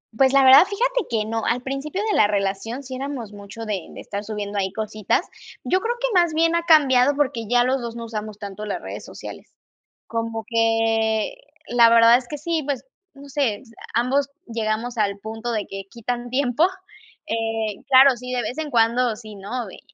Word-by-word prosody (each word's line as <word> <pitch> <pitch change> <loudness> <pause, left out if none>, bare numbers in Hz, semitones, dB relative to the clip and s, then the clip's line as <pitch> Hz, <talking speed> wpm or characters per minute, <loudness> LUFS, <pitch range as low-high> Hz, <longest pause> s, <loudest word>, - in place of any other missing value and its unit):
Pues, 265 +3 +4
la 275 -1 +6
verdad 265 +3 +9
fíjate 485 +3 -1
que 220 -3 0
no. 225 0 -2
Al 240 +1 0
principio 275 +8 -4
de - - +1
la 205 - +5
relación 205 +5 -2
sí 260 -1 -7
eramos 255 -5 -5
mucho 205 +3 -9
de 200 -6 -3
de - - -10
estar 200 0 -5
subiendo 210 -1 -5
ahí 190 -1 0
cositas. 215 - -1 0.4
Yo 370 +1 +1
creo 470 +3 -1
que - - +1
más 345 -2 +2
bien 330 +1 +2
ha 340 - +1
cambiado 285 -5 +5
porque 260 -6 -1
ya 245 0 +4
los 260 +1 0
dos 235 -1 -6
no 235 0 -6
usamos 215 -2 -6
tanto 205 0 -7
las 205 - -4
redes - - -7
sociales. - - -10 0.6
Como 230 -1 -3
que, 225 -1 +1 0.4
la 235 -1 +6
verdad 230 +1 +7
es 250 -1 -8
que 295 - -4
sí, 320 +1 -2
pues, 280 -2 -3 0.3
no 280 0 -13
sé, 265 -8 -1 0.3
ambos 265 +4 +1 0.2
llegamos 230 +1 -2
al 200 -2 0
punto 225 +3 -5
de 215 -3 -2
que 195 0 -6
quitan 240 +1 -4
tiempo, 255 +4 +2 0.6
eh, 225 -2 -2
claro, 265 0 +7
sí, 250 +1 -7
de 250 - 0
vez 250 - -4
en 310 -1 -3
cuando 235 0 +2
sí, 215 -1 -11
¿no?, 205 +3 -5
eh, - - -12
235 Hz, 195 wpm, -22 LUFS, 215-270 Hz, 0.6 s, verdad